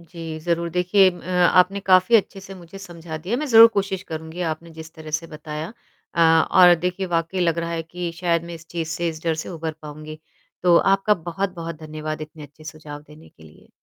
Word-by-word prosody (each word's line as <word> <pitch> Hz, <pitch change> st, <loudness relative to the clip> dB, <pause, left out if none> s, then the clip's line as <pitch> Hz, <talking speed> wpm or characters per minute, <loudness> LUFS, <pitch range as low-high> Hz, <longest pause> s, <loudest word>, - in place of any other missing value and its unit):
जी, 165 Hz, -1 st, -8 dB
ज़रूर 170 Hz, +1 st, -1 dB
देखिए 185 Hz, +2 st, +3 dB
अ, 175 Hz, -, -12 dB
आपने 180 Hz, +2 st, +3 dB
काफ़ी 190 Hz, +4 st, +5 dB
अच्छे 195 Hz, -1 st, -2 dB
से 195 Hz, 0 st, -11 dB
मुझे 180 Hz, +1 st, -12 dB
समझा 170 Hz, -4 st, -9 dB
दिया। 185 Hz, +9 st, -3 dB
मैं 300 Hz, +3 st, -3 dB
ज़रूर 230 Hz, -2 st, +9 dB
कोशिश 195 Hz, -1 st, -1 dB
करूँगी 160 Hz, +1 st, -7 dB
आपने 165 Hz, +1 st, -6 dB
जिस 160 Hz, 0 st, -11 dB
तरह 155 Hz, -1 st, -10 dB
से 165 Hz, -, -12 dB
बताया 155 Hz, +3 st, -7 dB, 0.4 s
अ, 170 Hz, -, 0 dB, 0.3 s
और 180 Hz, -1 st, +7 dB
देखिए 180 Hz, +2 st, -3 dB
वाक़ई 170 Hz, +2 st, -2 dB
लग 170 Hz, -2 st, +1 dB
रहा 170 Hz, 0 st, -3 dB
है 165 Hz, -1 st, -3 dB
कि 175 Hz, +1 st, -6 dB
शायद 170 Hz, -2 st, 0 dB
मैं 170 Hz, -, -8 dB
इस 165 Hz, 0 st, -13 dB
चीज़ 165 Hz, -2 st, -4 dB
से 170 Hz, +1 st, -2 dB
इस 160 Hz, -1 st, -7 dB
डर 165 Hz, -1 st, +1 dB
से -, -, -9 dB
उभर 165 Hz, -2 st, -5 dB
पाऊँगी। 155 Hz, +1 st, -9 dB, 0.4 s
तो 175 Hz, -1 st, +5 dB
आपका 195 Hz, +4 st, +3 dB
बहुत-बहुत 170 Hz, -1 st, -5 dB
धन्यवाद 155 Hz, 0 st, -6 dB
इतने 155 Hz, 0 st, -11 dB
अच्छे 150 Hz, +2 st, -15 dB
सुझाव 155 Hz, -2 st, -9 dB
देने 150 Hz, +2 st, -17 dB
के 80 Hz, -, -22 dB
लिए। 80 Hz, -1 st, -18 dB
170 Hz, 210 wpm, -22 LUFS, 160-180 Hz, 0.4 s, ज़रूर